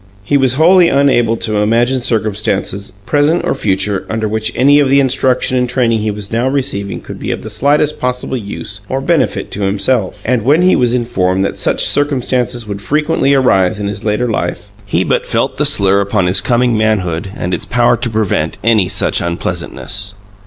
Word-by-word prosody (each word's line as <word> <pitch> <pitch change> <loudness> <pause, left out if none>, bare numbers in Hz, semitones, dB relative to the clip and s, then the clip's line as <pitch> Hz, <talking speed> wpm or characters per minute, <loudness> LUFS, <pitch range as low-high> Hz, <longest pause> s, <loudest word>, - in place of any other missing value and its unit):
He 120 - 0
was 130 -2 +3
wholly 175 +3 +5
unable 130 -5 +2
to 110 -1 -2
imagine 120 +5 +1
circumstances, 105 -3 -2
present 150 +3 +1
or - - +1
future, 100 -4 -1
under 110 0 -2
which 110 +1 -2
any 140 +3 +4
of 140 -2 +2
the 140 +1 +4
instruction 130 -1 +1
and 125 -1 0
training 120 -3 +1
he 110 0 -2
was 105 -1 -5
now 115 +3 0
receiving 130 -8 -2
could - - -9
be - - -5
of - - -3
the 110 - -7
slightest 145 +7 +1
possible 125 +1 -2
use 100 -2 -6
or 135 - -1
benefit 135 - 0
to 105 - -5
himself; 100 +2 -1
and 125 0 +1
when 145 +9 +3
he 185 - +4
was 125 -1 +1
informed 95 -6 0
that - - -3
such - - 0
circumstances 125 -4 0
would 100 -1 -5
frequently 140 +2 +1
arise 105 -6 +2
in 105 - -3
his 100 0 -5
later 110 +3 0
life, 110 - -3 0.2
he - - 0
but - - 0
felt - - -1
the - - +3
slur 100 0 +3
upon 100 -1 0
his 90 +2 +2
coming 120 -1 +1
manhood 100 -4 -1
and 90 +1 -3
its 90 - -3
power 120 0 +2
to 120 +1 -3
prevent 105 -8 -1
any 110 -5 +2
such - - 0
unpleasantness. 95 +3 -3
115 Hz, 190 wpm, -14 LUFS, 100-130 Hz, 0.2 s, wholly